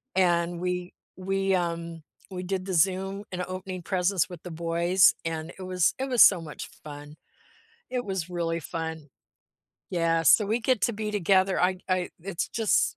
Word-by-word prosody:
and 175 -2 +2
we 180 0 -3 0.2
we, 195 0 0
um 170 -2 -3 0.3
we 180 0 -5
did 185 0 -3
the 190 - -3
Zoom 190 +3 +1
and 180 0 -3
opening 185 0 -6
presents 185 0 +1
with 175 -3 -10
the 180 - -7
boys 170 +3 +3
and 160 0 -3
it - - -6
was 185 -2 +1
it 265 - -1
was 245 -2 +7
so 185 - +6
much 150 -2 -8
fun. 145 0 -10 0.7
It 250 -2 -2
was 190 -3 -3
really 170 -1 -2
fun. 160 -2 -5 0.8
Yeah, 165 -2 +1
so 200 +7 +6
we 220 +3 +1
get 250 -3 +1
to 235 - +2
be 210 0 -3
together, 190 -1 +2
I'd 185 0 +1
I 185 -1 0
it's 190 -2 -3
just 225 -3 +1
180 Hz, 170 wpm, -27 LUFS, 170-190 Hz, 0.8 s, was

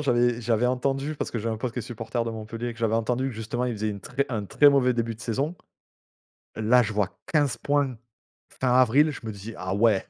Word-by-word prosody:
j'avais 120 -4 +2
j'avais 115 +1 +2
entendu, 135 +4 0
parce - - -3
que 120 - -3
j'avais 110 +1 -2
un - - -6
pote 120 +1 -3
qui 125 - -5
est - - -2
supporter 115 +1 -3
de 115 - -3
Montpellier, 115 +2 -5
que - - -17
j'avais 115 -1 +1
entendu 125 +4 0
que 125 - -6
justement 110 +3 -3
ils 125 - -1
faisaient 110 -1 -2
une 100 -1 -4
très 135 +7 -2
un 110 -5 -2
très 145 +8 +5
mauvais 130 -3 +4
début 115 -1 -1
de 110 - -17
saison. 135 +9 -1 1.0
Là, 115 +3 +4
je 110 -1 -2
vois 100 -1 -1
15 145 -7 +2
points 145 -4 0 0.6
fin 130 -1 +2
avril, 130 +5 +5
je 145 - -7
me 110 - -4
dis: 105 +3 -8
«Ah 95 +1 -3
ouais, 105 -2 +3
120 Hz, 240 wpm, -26 LUFS, 110-130 Hz, 1.0 s, très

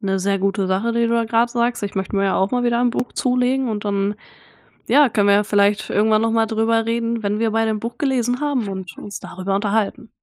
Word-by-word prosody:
'ne 195 -1 -1
sehr 195 +1 0
gute 195 0 0
Sache, 195 +5 0
die 235 0 +1
du 230 - -1
da 230 -1 +1
grad 230 +1 +2
sagst. 235 -1 -1
Ich 200 - -5
möchte 190 +1 -3
mir 195 - +2
ja 195 - +1
auch 190 +1 +1
mal 245 -1 0
wieder 240 0 +1
ein 245 0 +2
Buch 245 +1 -3
zulegen 250 +1 0
und 210 -2 -4
dann, 200 0 -1 0.7
ja, 285 -3 +5
können 205 -2 +1
wir 200 - +5
ja 205 - +3
vielleicht 205 0 +1
irgendwann 215 +1 +2
noch 225 0 +1
mal 225 0 +2
drüber 225 0 +1
reden, 230 0 -1
wenn 205 +1 -1
wir 225 -1 +1
beide 225 0 +1
'n 215 - -2
Buch 235 +1 -5
gelesen 250 -3 0
haben 270 -8 -1
und 190 -4 -7
uns 205 - -8
darüber 190 +2 -4
unterhalten. 215 +3 -1
220 Hz, 245 wpm, -20 LUFS, 200-235 Hz, 0.7 s, ja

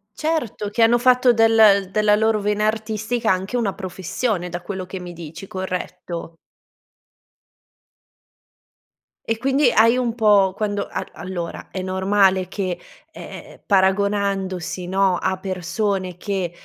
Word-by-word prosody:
Certo, 305 -10 -2
che 225 +3 +2
hanno 235 +1 +4
fatto 250 0 +4
del 220 -4 +5
della 210 0 +3
loro 220 0 +2
vena 210 +1 0
artistica 220 +1 -1
anche 190 +6 -1
una 215 -5 0
professione, 190 +1 -3
da 175 0 -6
quello 190 0 -5
che 185 +1 -7
mi 180 -1 -8
dici, 165 +2 -9
corretto? 180 -3 -5 2.9
E 225 0 -1
quindi 270 +1 +2
hai 230 +2 +5
un 240 -2 -1
po' 205 -4 +4
quando 205 -1 -2
a - - -5
allora 175 -2 -6
è 190 - -4
normale 190 0 +2
che, 185 -3 -3 0.4
ehm, - - -11
paragonandosi, 190 -2 0
no, 190 -1 +2
a 190 +1 -1
persone 185 0 -2
che, 190 -3 -3
200 Hz, 125 wpm, -21 LUFS, 185-220 Hz, 2.9 s, del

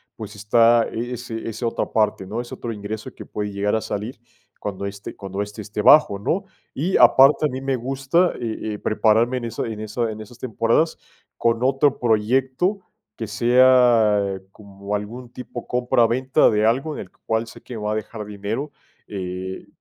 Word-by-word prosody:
pues 105 -1 -8
está 115 +3 +4
ese 120 -1 -5
ese 115 +2 -5
otra 115 - 0
parte, 105 -3 +1
¿no?, 110 +5 -3
ese 120 - -8
otro 115 - -5
ingreso 105 +1 -6
que - - -10
puede 105 -1 -4
llegar 100 +1 0
a 110 - 0
salir 110 +5 -5 0.4
cuando 100 -1 -4
este 100 0 -8
cuando 100 0 -4
este 105 +1 -8
esté 105 +1 -4
bajo, 145 -8 +6
¿no?, 175 - -1 0.3
y 170 +7 0
aparte 135 +5 +6
a - - +2
mí 130 +1 -5
me 135 0 0
gusta, 135 +8 +1
eh 110 -2 -3
eh, 105 - -6
prepararme 115 +3 +2
en 120 - -4
esa 115 0 -3
en 110 -2 -5
esa 110 +2 -2
en 110 0 -7
esas 115 +3 -13
temporadas 115 +6 +1 0.4
con 115 0 +1
otro 135 +2 +2
proyecto 130 - +1 0.4
que 115 - -5
sea 115 -4 +4
como 100 0 -6
algún 115 +4 -6
tipo 125 -1 -8
compra 125 -1 +2
venta 130 +3 +3
de 105 0 +2
algo 135 +7 +1
en - - -5
el - - -11
cual 110 +1 -2
sé 115 - -13
que 125 - -9
me 105 - -6
va 105 - -1
a - - 0
dejar 110 0 -5
dinero, 105 +8 -4 0.4
eh, 95 -1 -5
115 Hz, 185 wpm, -22 LUFS, 105-125 Hz, 0.4 s, bajo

